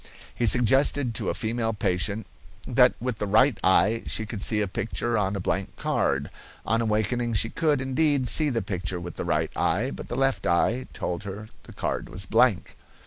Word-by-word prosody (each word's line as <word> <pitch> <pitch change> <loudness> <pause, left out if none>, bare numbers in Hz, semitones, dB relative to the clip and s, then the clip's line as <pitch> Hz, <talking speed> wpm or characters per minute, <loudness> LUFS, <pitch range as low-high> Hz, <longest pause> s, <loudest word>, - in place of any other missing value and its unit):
He 120 - 0
suggested 125 +3 +3
to - - -2
a - - -2
female 115 0 -2
patient 100 0 -1 0.4
that - - +4
with 125 -2 -4
the 105 - -2
right 110 +3 +3
eye 105 +4 +3
she 110 - +1
could 105 -2 -6
see 110 0 +1
a 105 - 0
picture 115 +4 -2
on 100 -2 0
a - - -3
blank 95 +1 -3
card. 70 +1 -1 0.3
On 115 +2 +1
awakening 115 +2 -1
she 110 +3 +1
could, 155 -4 +1
indeed, 135 0 +1
see 155 +3 +5
the 115 -4 -2
picture 90 -2 -4
with 85 -1 -7
the - - -4
right - - 0
eye, 110 +11 0
but - - -8
the 120 - -5
left 135 -8 0
eye 115 +9 +1
told 85 -1 -4
her 105 +2 -7 0.2
the - - -13
card - - -3
was 95 +1 -3
blank. 110 -2 +2
110 Hz, 195 wpm, -25 LUFS, 95-125 Hz, 0.4 s, see